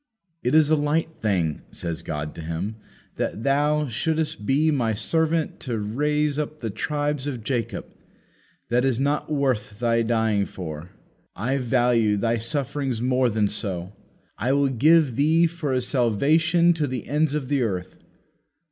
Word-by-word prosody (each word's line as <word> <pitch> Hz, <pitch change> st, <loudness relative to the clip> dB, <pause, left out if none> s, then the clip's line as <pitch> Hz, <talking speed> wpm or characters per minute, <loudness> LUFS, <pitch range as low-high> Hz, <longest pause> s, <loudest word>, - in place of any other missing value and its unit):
'It 125 Hz, +4 st, +1 dB
is 155 Hz, -1 st, +5 dB
a -, -, +6 dB
light 155 Hz, +2 st, 0 dB
thing,' 90 Hz, -8 st, 0 dB
says 85 Hz, -1 st, -4 dB
God 75 Hz, -2 st, -4 dB
to -, -, -8 dB
Him, 85 Hz, +7 st, -4 dB, 0.4 s
'that 110 Hz, -, -2 dB
Thou 150 Hz, +2 st, +2 dB
shouldest 150 Hz, -2 st, -2 dB
be 150 Hz, +4 st, +3 dB
My 115 Hz, -7 st, 0 dB
servant 160 Hz, +6 st, 0 dB
to 120 Hz, -3 st, -3 dB
raise 150 Hz, +7 st, 0 dB
up 150 Hz, 0 st, -3 dB
the 115 Hz, -7 st, -4 dB
tribes 145 Hz, +3 st, -2 dB
of 125 Hz, -6 st, -4 dB
Jacob 120 Hz, -1 st, -2 dB, 0.8 s
that 125 Hz, +1 st, +2 dB
is 130 Hz, -3 st, +1 dB
not 145 Hz, +3 st, 0 dB
worth 130 Hz, -8 st, 0 dB
Thy 115 Hz, 0 st, +2 dB
dying 110 Hz, -3 st, +1 dB
for. 80 Hz, -3 st, -7 dB, 0.5 s
I 130 Hz, +5 st, -1 dB
value 120 Hz, -4 st, +2 dB
Thy 115 Hz, +3 st, 0 dB
sufferings 135 Hz, 0 st, -2 dB
more 125 Hz, +1 st, +2 dB
than 105 Hz, -1 st, +1 dB
so. 95 Hz, -3 st, -3 dB, 0.5 s
I 125 Hz, +6 st, +1 dB
will 140 Hz, 0 st, +3 dB
give 145 Hz, 0 st, +4 dB
Thee 160 Hz, +4 st, +4 dB
for 165 Hz, -4 st, -2 dB
a 130 Hz, -1 st, +1 dB
salvation 155 Hz, -, +3 dB
to 155 Hz, -3 st, -1 dB
the 130 Hz, -4 st, -5 dB
ends 150 Hz, +2 st, +1 dB
of 145 Hz, -4 st, -2 dB
the 140 Hz, -1 st, +1 dB
earth.' 95 Hz, -5 st, -3 dB
130 Hz, 155 wpm, -24 LUFS, 110-150 Hz, 0.8 s, a